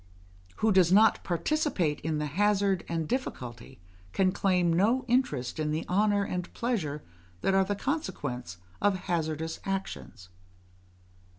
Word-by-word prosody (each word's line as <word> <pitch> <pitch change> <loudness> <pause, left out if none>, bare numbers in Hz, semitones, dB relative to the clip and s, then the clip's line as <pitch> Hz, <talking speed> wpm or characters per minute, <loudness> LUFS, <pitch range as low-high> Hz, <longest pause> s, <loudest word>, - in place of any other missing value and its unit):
Who 220 - +2
does 185 -3 +5
not 215 +3 +5
participate 180 - 0
in 155 0 -2
the 150 - -1
hazard 195 +4 +1
and 165 -2 -1
difficulty, 130 - -5 0.3
can 190 -1 +3
claim 180 -3 +2
no 225 +9 +2
interest 160 - 0
in 155 -1 0
the 155 +2 -2
honour 205 +2 +2
and 180 -2 -4
pleasure 170 - -2 0.4
that 195 - +1
are 195 0 +5
the 205 +2 -2
consequents 145 - -3 0.2
of 195 -2 +2
hazardous 160 -2 -2
actions. 195 - -5
185 Hz, 130 wpm, -29 LUFS, 155-205 Hz, 0.4 s, does